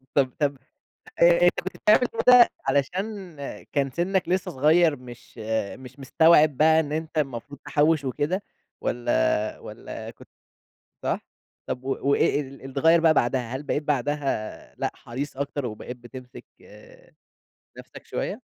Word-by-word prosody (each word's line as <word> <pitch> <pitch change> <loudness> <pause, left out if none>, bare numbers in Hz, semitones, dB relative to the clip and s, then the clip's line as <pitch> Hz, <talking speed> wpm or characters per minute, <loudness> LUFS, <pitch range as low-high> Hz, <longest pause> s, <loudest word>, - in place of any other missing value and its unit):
طب 130 -3 +3
طب 145 -2 0 0.6
آآ، - - +5 0.2
أنت 175 0 +4
كنت 185 +1 -7
بتعمل 210 - +4 0.3
كده 250 -1 +8 0.2
علشان 185 +4 -2 0.4
كان 140 -2 0
سنك 180 +4 -1
لسه 185 0 0
صغير 155 +3 +3
مش 120 -1 -14 0.4
مش 130 +1 -13
مستوعب 150 +1 +4
بقى 160 +1 +5
إن 150 -2 -4
أنت 160 0 -3
المفروض 135 0 -4
تحوّش 150 0 +2
وكده 145 +9 -1 0.4
والّا 120 -2 0
والّا - - -9
كنت - - -17 0.7
صح؟ - - -1 0.5
طب 125 +1 -5
و 135 - -2
وإيه 145 - +2
اللي 135 -1 -10
اتغيّر 160 +5 +4
بقى 160 -1 +4
بعدها؟ 125 -1 0
هل 140 - -7
بقيت 145 +1 -2
بعدها 145 -5 -2
لأ، - - -2
حريص 130 +3 -6
أكتر 140 -1 -3
وبقيت 120 +2 -7
بتمسك 125 +1 -12 1.3
نفسك - - -12
شوية؟ - - -3
145 Hz, 135 wpm, -25 LUFS, 130-160 Hz, 1.3 s, كده